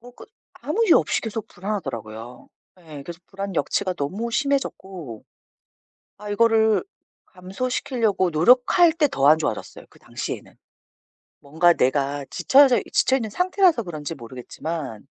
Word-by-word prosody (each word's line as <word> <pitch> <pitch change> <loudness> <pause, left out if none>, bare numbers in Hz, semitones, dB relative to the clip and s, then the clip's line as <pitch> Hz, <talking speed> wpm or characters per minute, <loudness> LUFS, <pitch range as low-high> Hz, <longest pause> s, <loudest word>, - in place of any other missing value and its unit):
뭐 245 +1 -14
끝 - - -15 0.3
아무 400 +11 0
이유 345 - +6
없이 - - -1
계속 225 -1 -5
불안하더라고요. 125 - -6 0.3
예. 155 -4 -10
그래서 170 +2 -9
불안 195 -1 -6
역치가 185 +2 -1
너무 190 +10 -4
심해졌고 190 - -3 0.9
아 210 0 -8
이거를 220 0 +3 0.4
감소시키려고 200 +1 -2
노력할 250 - +4
때 310 -2 +3
더 140 - 0
안 155 +1 +6
좋아졌어요 145 -9 -4
그 - - -21
당시에는. - - -7 0.8
뭔가 160 +5 +3
내가 140 +1 0
지쳐져 270 -2 +5
있 - - -13
지쳐 265 - +3
있는 225 -5 -4
상태라서 360 - +2
그런지 160 -2 -6
모르겠지만 130 0 -7
190 Hz, 325 characters per minute, -23 LUFS, 145-245 Hz, 0.9 s, 이유